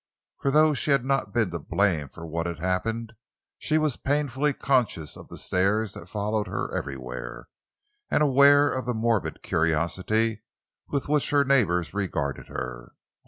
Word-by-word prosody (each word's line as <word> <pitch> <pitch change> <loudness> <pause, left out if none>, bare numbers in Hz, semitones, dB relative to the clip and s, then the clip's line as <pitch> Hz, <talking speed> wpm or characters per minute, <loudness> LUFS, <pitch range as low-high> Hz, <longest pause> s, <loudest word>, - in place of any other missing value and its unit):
For 140 - 0
though 155 +2 +5
she 145 - -2
had 140 -3 +3
not 135 -6 0
been 110 -5 +1
to 85 - -3
blame 80 -3 0
for 85 - -10
what 85 +1 -3
had 85 -2 -4
happened, 110 +7 -2 0.5
she 155 - +1
was 155 -4 +1
painfully 145 0 0
conscious 125 - 0
of - - -12
the - - -10
stares 100 +3 0
that 85 - -11
followed 105 +1 -1
her - - -3
everywhere, 65 -3 -6 0.6
and 150 - +3
aware 145 +1 +6
of 130 -1 -3
the 125 - 0
morbid 110 -2 0
curiosity 90 +8 0 0.5
with 140 -2 -2
which 150 0 +1
her 145 -1 +3
neighbors 90 -12 +2
regarded 90 -9 -2
her. - - -6
110 Hz, 160 wpm, -26 LUFS, 85-135 Hz, 0.6 s, aware